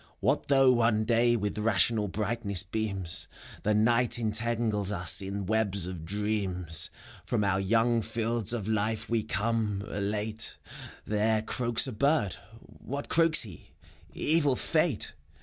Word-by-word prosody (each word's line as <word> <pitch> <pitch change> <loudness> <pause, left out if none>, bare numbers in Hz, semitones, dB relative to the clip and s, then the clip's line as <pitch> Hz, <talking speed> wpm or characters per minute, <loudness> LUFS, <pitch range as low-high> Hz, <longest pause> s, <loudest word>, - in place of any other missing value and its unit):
What - - 0
though 135 -2 +5
One 115 -2 +2
Day 120 +1 +3
with 105 -1 -2
rational 105 0 +2
brightness 105 -2 -1
beams, 100 -4 -2 0.3
The 105 0 +1
Night 120 +2 +3
entangles 110 -2 0
us 90 -2 +2
in 100 0 -4
webs 100 -3 0
of 90 -3 -6
dreams. 95 -4 -1 0.3
From 105 - -1
our 95 -1 +1
young 115 +4 +2
fields 115 0 0
of 115 -4 -2
life 110 +1 -1
we 115 -1 +2
come, 110 -2 -1
elate: 105 +2 -3 0.5
There 110 +1 +1
croaks 120 +1 +2
a 130 - -4
bird: 120 -3 +1 0.4
what 140 +2 -6
croaks 165 -3 +5
he? 95 -8 -12 0.4
Evil 150 -4 +1
fate 155 -4 0
110 Hz, 130 wpm, -28 LUFS, 100-120 Hz, 0.5 s, though